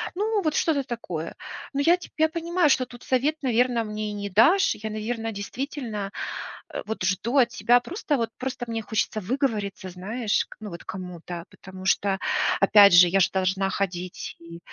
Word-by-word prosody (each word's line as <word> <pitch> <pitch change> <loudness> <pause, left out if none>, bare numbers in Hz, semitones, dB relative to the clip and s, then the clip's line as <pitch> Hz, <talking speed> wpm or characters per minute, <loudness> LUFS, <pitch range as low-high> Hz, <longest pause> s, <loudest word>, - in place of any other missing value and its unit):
Ну, 420 +2 0
вот 310 -1 0
что-то 295 -4 +2
такое. 180 -10 -5 0.4
Но 280 - 0
я 340 +5 +5
теб 360 - -12
я 315 0 +4
понимаю, 335 0 +1
что 260 -2 +3
тут 245 -1 -13
совет, 280 +3 +1
наверно, 245 -1 +2
мне 215 0 -4
и - - -5
не 205 0 -4
дашь. 360 - +4
Я, 220 +1 -6
наверно, 225 +1 -3
действительно, 215 -1 -5 0.6
а, - - -5
вот 220 -3 -4
жду 195 +8 0
от 245 -3 +5
тебя 240 +1 +3
просто 330 - -2
вот, 230 -2 -1
просто 255 -1 -4
мне 225 -1 -3
хочется 220 0 -1
выговориться, 210 -4 -2
знаешь, 205 +5 -1
к - - -13
ну, 215 -1 -7
вот 170 - -8
кому-то. 175 -2 -7
Потому 190 -1 -11
что, 195 0 +2 0.4
опять 200 0 +7
же, 175 +1 +9
я 195 +3 +3
ж 185 - +4
должна 190 +1 0
ходить 185 -2 -4
и 170 0 -11
220 Hz, 185 wpm, -25 LUFS, 195-265 Hz, 0.6 s, же